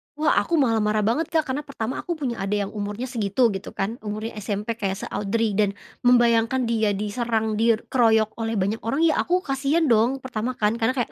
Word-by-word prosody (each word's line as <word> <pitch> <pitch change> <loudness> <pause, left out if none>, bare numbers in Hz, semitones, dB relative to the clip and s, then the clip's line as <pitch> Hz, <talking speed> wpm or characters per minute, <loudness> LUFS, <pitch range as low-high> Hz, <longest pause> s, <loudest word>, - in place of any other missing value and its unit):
Wah 305 0 +3
aku 340 - 0
malah 235 -7 +3
marah 210 0 +1
banget 270 +10 +1
Kak, 320 -2 +1
karena 285 +3 -2
pertama 255 -1 -4
aku 345 - -3
punya 255 -7 -3
adik 200 +1 0
yang 195 - -6
umurnya 210 +4 -4
segitu 225 0 +1
gitu 195 +1 -6
kan, 220 +6 -3
umurnya 215 +2 -5
SMP 210 +2 -3
kayak 195 -1 -2
se-Audrey 215 +2 -1
dan 200 -1 +1 0.3
membayangkan 240 0 +3
dia 220 -3 +1
diserang, 220 +1 -1
dir 230 -1 +2
keroyok 220 -3 +3
oleh 225 0 -2
banyak 200 +4 0
orang 275 +8 0
ya 315 - +3
aku 360 +1 0
kasihan 275 +4 +1
dong, 240 +2 +3
pertama 250 0 -3
kan, 210 +1 +2
karena 230 +3 +2
kayak 245 - -2
225 Hz, 200 wpm, -24 LUFS, 210-255 Hz, 0.3 s, Wah